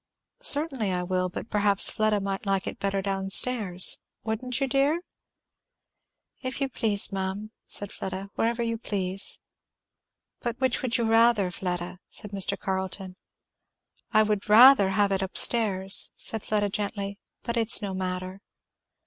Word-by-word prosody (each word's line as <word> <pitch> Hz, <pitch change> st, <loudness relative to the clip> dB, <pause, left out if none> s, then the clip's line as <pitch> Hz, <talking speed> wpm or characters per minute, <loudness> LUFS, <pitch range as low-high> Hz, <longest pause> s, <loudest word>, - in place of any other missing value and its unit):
"Certainly 275 Hz, -9 st, +1 dB
I 180 Hz, -1 st, -2 dB
will, 185 Hz, 0 st, -1 dB
but 180 Hz, -, -8 dB
perhaps 205 Hz, -2 st, +4 dB
Fleda 215 Hz, -1 st, 0 dB
might 195 Hz, +1 st, -5 dB
like 195 Hz, -2 st, 0 dB
it -, -, -6 dB
better 195 Hz, -1 st, -2 dB
down 195 Hz, -1 st, -3 dB
stairs. 195 Hz, -4 st, +1 dB, 0.2 s
Wouldn't 235 Hz, +3 st, -3 dB
you, 275 Hz, -, +1 dB
dear?" 280 Hz, +5 st, +1 dB, 1.4 s
"If 255 Hz, +1 st, -4 dB
you 275 Hz, -1 st, -1 dB
please, 210 Hz, -6 st, 0 dB
ma'am," 195 Hz, +2 st, -4 dB, 0.2 s
said 205 Hz, -1 st, 0 dB
Fleda. 190 Hz, +1 st, -6 dB
"Wherever 235 Hz, +1 st, -1 dB
you 230 Hz, -1 st, -3 dB
please." 195 Hz, -3 st, 0 dB, 1.0 s
"But 240 Hz, +1 st, -5 dB
which 260 Hz, -2 st, 0 dB
would 255 Hz, -2 st, -1 dB
you 235 Hz, -, -1 dB
rather, 225 Hz, -4 st, +3 dB
Fleda?" 180 Hz, -1 st, -5 dB
said 210 Hz, -3 st, -6 dB
Mr. 195 Hz, -2 st, +1 dB
Carleton. 190 Hz, 0 st, -5 dB, 1.0 s
"I 215 Hz, -, +4 dB
would 210 Hz, -1 st, -2 dB
rather 230 Hz, -2 st, +7 dB
have 200 Hz, +1 st, +1 dB
it 195 Hz, 0 st, 0 dB
up 190 Hz, -, -3 dB
stairs," 195 Hz, -4 st, +3 dB
said 220 Hz, -2 st, +1 dB
Fleda 205 Hz, -1 st, 0 dB
gently, 200 Hz, 0 st, -4 dB, 0.2 s
"but 235 Hz, -, -3 dB
it's 230 Hz, -1 st, +6 dB
no 195 Hz, -2 st, -4 dB
matter." 185 Hz, +1 st, -5 dB
205 Hz, 150 wpm, -26 LUFS, 190-230 Hz, 1.4 s, rather